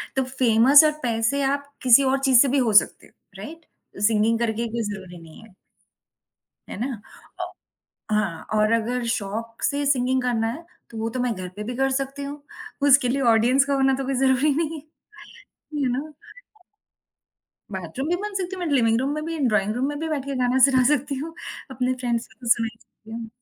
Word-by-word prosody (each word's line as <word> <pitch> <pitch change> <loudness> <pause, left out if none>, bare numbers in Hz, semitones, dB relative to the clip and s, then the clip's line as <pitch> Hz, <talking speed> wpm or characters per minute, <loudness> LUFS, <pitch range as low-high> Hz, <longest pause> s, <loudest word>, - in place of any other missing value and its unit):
तो 265 - +1
फेमस 255 +2 +5
और 305 - +4
पैसे 235 +4 0
आप 280 +1 -2
किसी 255 +2 +6
और 265 +1 +1
चीज़ 265 -3 +4
से 280 - +4
भी 275 +2 +1
हो 235 -5 +1
सकते 205 - +3
हो। - - -28 0.3
राइट? 330 +2 -10 0.4
सिंगिंग 225 +1 +1
करके 230 -1 -1
ही 235 - -1
कोई 235 +1 -3
ज़रूरी 195 -4 -7
नहीं 160 +5 -14
है। 220 -4 -18 1.2
है - - -6
ना? 245 -4 -3 0.4
औ - - -5 0.6
हाँ 210 -6 -1
और 215 +1 +2
अगर 235 +2 0
शौक 230 +1 -5
से 285 0 0
सिंगिंग 260 -1 +1
करना 230 -3 0
है, 310 +9 -6 0.3
तो 225 - -8
वो 225 +1 -2
तो 255 - -4
मैं 245 -1 0
घर 185 -2 -7
पे 210 - -5
भी 245 +2 -5
कर 270 +1 +1
सकती 275 +1 -3
हूँ, 285 +1 -7 0.5
उसके 260 -2 +5
लिए 275 +2 0
ऑडियंस 245 +5 +4
का 280 0 -1
होना 270 -1 +2
तो 270 - -4
कोई 270 +1 -2
ज़रूरी 265 +3 +2
नहीं 320 +1 -2
है, - - -24 1.0
यू 260 - +1
नो। 290 +5 -4 1.6
बाथरूम 190 - -5
भी 355 - +1
बन 415 +2 -6
सकती 380 -1 -3
हूँ, 365 - -6
मैं 305 - -2
लिविंग 230 -3 +3
रूम 270 - -1
में 305 - -4
भी, 330 0 -4
ड्रॉइंग 210 -1 0
रूम 255 +3 -1
में 290 - -4
भी 320 +1 -3
बैठकर 280 -2 -3
गाना 250 +1 +2
सुना 260 -2 +3
सकती 280 +1 -3
हूँ। 325 +1 -7 0.4
अपने 255 0 -1
फ़्रेंड्स 240 -2 -2
को - - -23
तो 240 - -6
सुना 230 0 +3
सकती 220 - -21
हूँ। 225 0 -6
255 Hz, 205 wpm, -23 LUFS, 225-280 Hz, 1.6 s, किसी